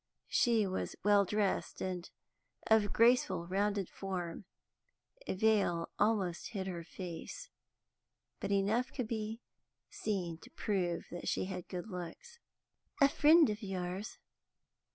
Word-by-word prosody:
She 230 -3 +3
was 190 -1 -3
well 205 -1 +5
dressed, 205 0 0
and 180 -1 -3 0.6
of 220 -2 +4
graceful, 230 -7 +4
rounded 200 +1 0
form; 185 -1 -5 0.8
a - - -1
veil 195 -5 +2
almost 200 -5 +1
hid 195 -5 -4
her 175 -3 -4
face, 185 - -7 0.9
but - - -3
enough 205 +5 +2
could 250 -5 -3
be 220 +1 -3 0.5
seen 180 -6 -2
to - - -14
prove 180 -5 -1
that 175 - -6
she - - 0
had 185 -2 -5
good 180 +2 -5
looks. 215 - -8 0.6
"That 280 -1 +6
a - - -15
friend 315 +1 +7
of 210 - -5
yours?" 190 0 -4
200 Hz, 130 wpm, -34 LUFS, 180-220 Hz, 0.9 s, friend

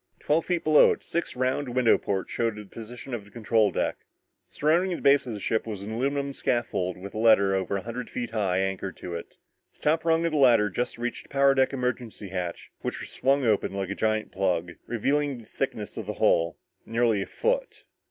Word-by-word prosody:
Twelve 155 +2 0
feet 175 -2 0
below 155 -1 +6
it, - - -11
six 170 - -3
round 130 0 -1
window 125 -3 +5
ports 95 -2 -2
showed 115 -2 0
the 105 0 -8
position 115 +5 -9
of 115 -4 -3
the 100 - -17
control 110 -1 +2
deck. - - -1 0.5
Surrounding 175 +5 +1
the - - -8
base 140 -1 +5
of 120 - -3
the - - -6
ship 110 +3 -1
was 105 -3 -5
an 105 - -6
aluminum 140 +4 -1
scaffold 110 -9 -1
with 100 +2 -9
a 110 - -4
ladder 110 -4 +5
over 95 +1 0
a 95 - -6
hundred 120 +2 -5
feet 120 -2 -4
high 100 -5 0
anchored 95 0 -2
to 90 - -7
it. 85 - -7 0.4
The - - -21
top 160 +2 +2
rung 165 0 +2
of 170 - +1
the 155 - +1
ladder 115 -6 +5
just 120 +6 -2
reached 120 +1 -4
the - - -22
power 140 0 +4
deck 130 -1 +3
emergency 125 -5 -3
hatch 90 -2 -5
which - - -3
was - - -7
swung 135 0 +1
open, 105 -3 +1
like 100 -1 -3
a - - 0
giant 110 0 0
plug, 90 -3 0 0.2
revealing 140 +4 0
the 115 - -12
thickness - - -4
of - - -5
the - - -3
hull, 85 0 +2 0.3
nearly 115 -2 +2
a - - -4
foot. - - -1
115 Hz, 220 wpm, -27 LUFS, 100-135 Hz, 0.5 s, below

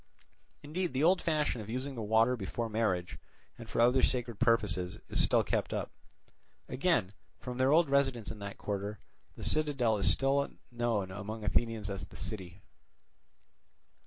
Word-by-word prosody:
Indeed, 170 +2 -2
the 135 +3 +1
old 180 +3 +5
fashion 150 -7 0
of 105 - -9
using 130 +4 -3
the 120 - -5
water 110 +3 +3
before 115 +2 -3
marriage 105 -5 -1 0.4
and 115 -2 -11
for - - -2
other 125 +3 +5
sacred 120 -4 0
purposes 105 -7 +1
is - - +2
still - - +3
kept - - -1
up. - - -3 0.8
Again, 130 - +1 0.3
from 125 0 -6
their 130 +1 +4
old 165 +1 +5
residence 135 -6 +1
in 110 - -8
that 100 0 -6
quarter, 100 +1 -3 0.4
the - - -9
citadel 140 -8 +1
is 100 - +3
still 140 +1 +2 0.2
known 115 -6 -1
among 105 +3 -6
Athenians 110 0 0
as 100 -2 -4
the - - -16
city. 95 -2 -7
115 Hz, 160 wpm, -32 LUFS, 105-135 Hz, 0.8 s, old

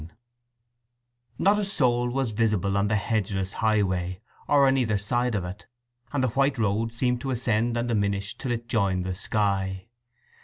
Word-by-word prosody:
III 80 +2 -12 1.2
Not 205 +2 +3
a - - 0
soul 125 -10 +2
was 130 -2 -1
visible 105 -3 +1
on 100 +1 +2
the 110 - +1
hedgeless 100 -3 -1
highway, 95 -5 0 0.3
or 140 -1 +5
on 135 - +3
either 110 -5 +1
side 120 +4 0
of 95 -3 -1
it, 90 +3 -8 0.4
and 140 -3 0
the 130 - +2
white 135 +3 +1
road 110 +1 0
seemed 125 +1 0
to 135 - -4
ascend 120 -1 0
and 120 +1 -1
diminish 100 -3 -1
till 125 - -4
it 120 0 -3
joined 100 -6 0
the 95 - -2
sky. 95 0 -1
110 Hz, 170 wpm, -26 LUFS, 100-125 Hz, 1.2 s, or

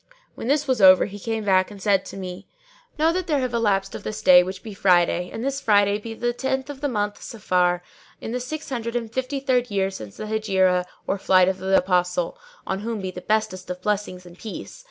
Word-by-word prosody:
When - - -7
this 290 +2 +1
was 255 -4 +1
over, 185 -1 +8
he 205 0 -8
came 225 +1 -3
back 185 -2 +3
and 205 -1 -11
said 195 -1 +2
to - - -9
me, 185 0 -7 0.5
"Know 320 +2 +3
that 370 0 -2
there 300 -3 +2
have 255 -2 -2
elapsed 200 -4 +1
of - - -6
this 215 0 -5
our - - -22
day, 180 -1 +9
which 185 +1 -5
be 220 - -7
Friday, 180 -2 +2
and 225 - -5
this 275 +1 -2
Friday 205 -1 +3
be 225 +1 -7
the 240 +1 -1
tenth 265 +2 -2
of 275 -1 -11
the 290 - 0
month 205 -3 -2
Safar 180 -5 0 0.4
in - - -6
the 250 - -2
six 300 +5 -6
hundred 235 -2 -3
and 230 -2 -3
fifty 260 +2 -2
third 255 -2 +1
year 195 -1 0
since 110 - -9
the - - -5
Hegira 190 -4 +1 0.2
or 200 - -1
Flight 185 -1 +4
of 190 0 -1
the 190 +1 +3
Apostle 180 -1 +1 0.3
(on 190 - -2
whom 225 +1 -3
be 190 -1 -4
the 180 - -8
bestest 215 -3 -1
of 180 0 -6
blessings 200 -3 -2
and 175 0 -14
peace!) 220 - -8
205 Hz, 235 wpm, -23 LUFS, 185-240 Hz, 0.5 s, day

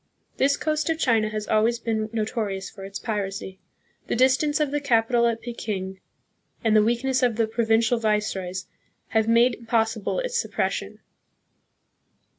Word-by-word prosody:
This 280 +1 +3
coast 310 +1 -1
of 325 - +1
China 225 -8 +2
has 215 -1 -4
always 225 +2 +2
been 220 -2 -2
notorious 215 -4 -3
for 195 - -11
its 195 0 -6
piracy. 195 -3 -4 0.5
The - - -1
distance 265 +5 +3
of 300 -2 +1
the 290 0 -1
capital 235 -2 +3
at 230 -1 -1
Peking 195 -5 -5 0.6
and 220 -1 +3
the 215 - +7
weakness 240 +4 +1
of 245 -3 +2
the 225 0 +2
provincial 225 +1 +2
viceroys 195 -4 -1 0.4
have 220 -1 +1
made 235 +2 +5
impossible 225 -2 -1
its - - -1
suppres - - -1
sion. - - -6
225 Hz, 150 wpm, -25 LUFS, 215-245 Hz, 0.6 s, the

